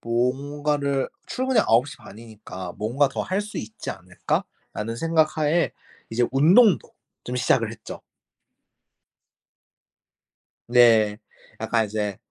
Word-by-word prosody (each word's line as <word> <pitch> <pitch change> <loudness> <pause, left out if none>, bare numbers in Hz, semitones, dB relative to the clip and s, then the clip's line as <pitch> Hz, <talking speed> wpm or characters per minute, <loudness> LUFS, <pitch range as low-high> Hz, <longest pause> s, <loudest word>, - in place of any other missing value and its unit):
뭔가를 140 +4 -1 0.2
출근이 255 -3 +1
9 115 +4 +3
시 - - -9
반이니까 105 -5 -10
'뭔가 125 +7 +1
더 135 - -4
할 190 +2 -1
수 210 0 -8
있지 110 0 -6
않을까?'라는 115 +2 -5
생각 160 +2 +1
하에 155 +3 +2 0.4
이제 120 +2 +1
운동도 180 - +5 0.3
좀 125 +1 -5
시작을 125 - +1
했죠. - - -10 2.7
네. 115 -4 +5 0.4
약간 115 -2 +1
이제 105 -2 -3
125 Hz, 210 characters per minute, -24 LUFS, 110-150 Hz, 2.7 s, 운동도